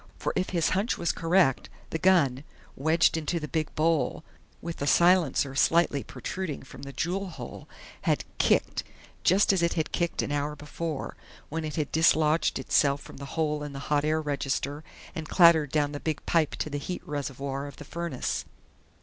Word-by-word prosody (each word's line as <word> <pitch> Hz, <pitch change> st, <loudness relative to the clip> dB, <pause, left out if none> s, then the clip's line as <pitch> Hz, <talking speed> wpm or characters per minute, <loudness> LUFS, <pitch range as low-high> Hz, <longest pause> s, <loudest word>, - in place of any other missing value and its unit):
For -, -, -2 dB
if 185 Hz, 0 st, 0 dB
his 170 Hz, -3 st, +1 dB
hunch 200 Hz, +5 st, 0 dB
was 170 Hz, -, +1 dB
correct, 165 Hz, -5 st, +2 dB, 0.2 s
the 160 Hz, -, -2 dB
gun, 150 Hz, -8 st, +3 dB, 0.3 s
wedged 160 Hz, +4 st, +3 dB
into 160 Hz, +2 st, -1 dB
the 150 Hz, -, -5 dB
big 155 Hz, +2 st, -2 dB
bowl, 160 Hz, 0 st, +1 dB, 0.4 s
with 170 Hz, -1 st, -6 dB
the 140 Hz, -, -3 dB
silencer 170 Hz, -6 st, +4 dB
slightly 145 Hz, 0 st, +3 dB
protruding 150 Hz, +5 st, -5 dB
from 135 Hz, -, -12 dB
the 140 Hz, 0 st, -7 dB
jewel 180 Hz, +8 st, -2 dB
hole, 175 Hz, -, -9 dB, 0.3 s
had -, -, 0 dB
"kicked," -, -, +2 dB, 0.4 s
just 195 Hz, +3 st, +4 dB
as 190 Hz, -, +1 dB
it 170 Hz, -, +2 dB
had 160 Hz, -2 st, -2 dB
kicked 170 Hz, -2 st, -1 dB
an -, -, -3 dB
hour 145 Hz, +1 st, -1 dB
before, 150 Hz, +1 st, -5 dB, 0.3 s
when 160 Hz, +1 st, -3 dB
it 155 Hz, -2 st, -4 dB
had 150 Hz, -3 st, -2 dB
dislodged 160 Hz, 0 st, +3 dB
itself 140 Hz, -1 st, +2 dB
from -, -, -12 dB
the 140 Hz, -, -7 dB
hole 150 Hz, -2 st, 0 dB
in 145 Hz, -1 st, -6 dB
the -, -, -6 dB, 0.2 s
hot 145 Hz, -1 st, +3 dB
air 155 Hz, +1 st, +1 dB
register 140 Hz, 0 st, -2 dB, 0.3 s
and 160 Hz, -1 st, -6 dB
clattered 165 Hz, -5 st, +6 dB
down 145 Hz, -2 st, +1 dB
the 145 Hz, -, -5 dB
big 155 Hz, -1 st, -3 dB
pipe 160 Hz, -3 st, +2 dB
to 155 Hz, -, -4 dB
the 145 Hz, -, -2 dB
heat 180 Hz, +5 st, -5 dB
reservoir 140 Hz, -1 st, -4 dB
of 140 Hz, -, -10 dB
the 145 Hz, -, -11 dB
furnace. 170 Hz, -4 st, -3 dB
155 Hz, 185 wpm, -28 LUFS, 145-170 Hz, 0.4 s, clattered